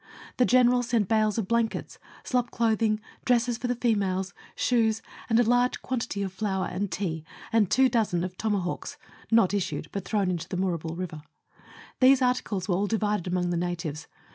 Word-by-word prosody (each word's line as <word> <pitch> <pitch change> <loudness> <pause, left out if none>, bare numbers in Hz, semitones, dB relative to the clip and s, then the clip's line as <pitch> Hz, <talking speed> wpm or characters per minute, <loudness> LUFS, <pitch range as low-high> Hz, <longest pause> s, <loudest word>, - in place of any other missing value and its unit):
The 250 - +4
General 250 0 +5
sent 235 -4 0
bales 215 0 +2
of 215 -4 -1
blankets, 230 0 -1 0.2
slop 250 -1 0
clothing, 220 -2 +1 0.2
dresses 240 -1 +2
for 250 - -2
the 245 - 0
females, 200 -5 0 0.2
shoes, 225 -3 +1 0.3
and 225 0 +4
a - - +6
large 245 +2 +2
quantity 245 -5 -2
of 190 -1 -4
flour 190 -1 -1
and 185 +2 -3
tea, 165 -5 -3 0.3
and 215 -5 +4
two 265 0 +5
dozen 215 -8 +1
of 180 0 -4
toma 210 -1 0
hawks 175 - -5 0.3
(not 225 -4 +4
issued, 160 -6 -2
but 200 - -4
thrown 200 -2 0
into 175 +1 -4
Moorabool 170 -3 -2
River). 170 -4 -5 0.8
These 265 +1 +6
articles 225 -7 0
were 190 - +1
all 200 +3 +1
divided 210 -4 0
amongst 180 0 0
the 175 - 0
natives. 170 -3 -3
210 Hz, 175 wpm, -27 LUFS, 185-235 Hz, 0.8 s, a